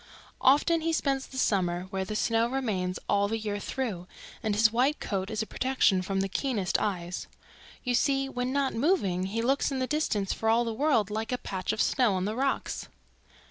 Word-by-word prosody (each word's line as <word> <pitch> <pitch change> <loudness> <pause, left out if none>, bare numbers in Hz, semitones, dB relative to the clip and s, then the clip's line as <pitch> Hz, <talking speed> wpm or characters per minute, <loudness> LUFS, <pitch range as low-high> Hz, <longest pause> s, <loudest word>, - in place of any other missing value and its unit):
"Often 300 +5 +4
he 330 +1 0
spends 275 -3 0
the 265 - -10
summer 180 -7 +1
where 190 -1 -1
the 210 +3 -5
snow 225 +1 +2
remains 210 -8 -1
all 200 0 +2
the 225 +2 -1
year 210 -2 -3
through 205 -7 -4 0.3
and 215 -2 0
his 220 +1 +5
white 260 +6 +2
coat 195 -1 -2
is 220 0 -1
a - - -6
protection 250 -7 +2
from 195 +1 -1
the 195 - 0
keenest 200 -3 0
eyes. 180 -4 -3 0.6
You 250 - 0
see, 270 +2 +2
when 250 -1 -2
not 275 -1 +1
moving, 225 - +1
he 225 +4 -2
looks 270 +3 +2
in 270 - -1
the 260 - 0
distance 255 -9 0
for 220 - -1
all 235 +2 +3
the 230 - -2
world 225 -6 +2
like 220 +2 -3
a 250 - 0
patch 190 -6 -3
of - - +1
snow 245 -7 +2
on 185 0 -1
the 210 +2 -2
rocks. 270 +2 -1
225 Hz, 205 wpm, -28 LUFS, 195-265 Hz, 0.6 s, his